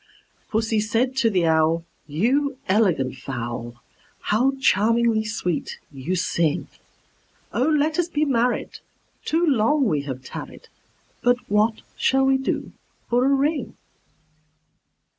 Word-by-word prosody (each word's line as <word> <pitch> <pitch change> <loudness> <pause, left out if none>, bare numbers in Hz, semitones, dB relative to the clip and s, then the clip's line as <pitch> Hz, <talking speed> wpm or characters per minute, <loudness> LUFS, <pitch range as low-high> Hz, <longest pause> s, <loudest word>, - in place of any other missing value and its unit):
Pussy 220 -1 0
said 230 +5 0
to 240 -4 +3
the 185 -5 +1
Owl, 160 +1 +2 0.2
"You 260 - 0
elegant 175 - +2
fowl, 120 -2 -5 0.5
How 250 +6 +2
charmingly 230 0 +3
sweet 210 -6 -3
you 145 +6 -3
sing! 170 -3 0 0.9
Oh, 250 +4 +1
let 310 +1 +1
us 345 - +2
be 305 -2 +1
married; 245 -3 0 0.5
too 330 +2 +1
long 275 0 +3
we 150 -9 +1
have 130 -2 -6
tarried: - - -9 0.5
But 245 0 +3
what 215 +2 +2
shall 270 0 +3
we 270 0 +3
do 265 - -2 0.4
for 245 +1 +3
a - - +3
ring?" 280 +3 0
225 Hz, 120 wpm, -23 LUFS, 165-265 Hz, 0.9 s, to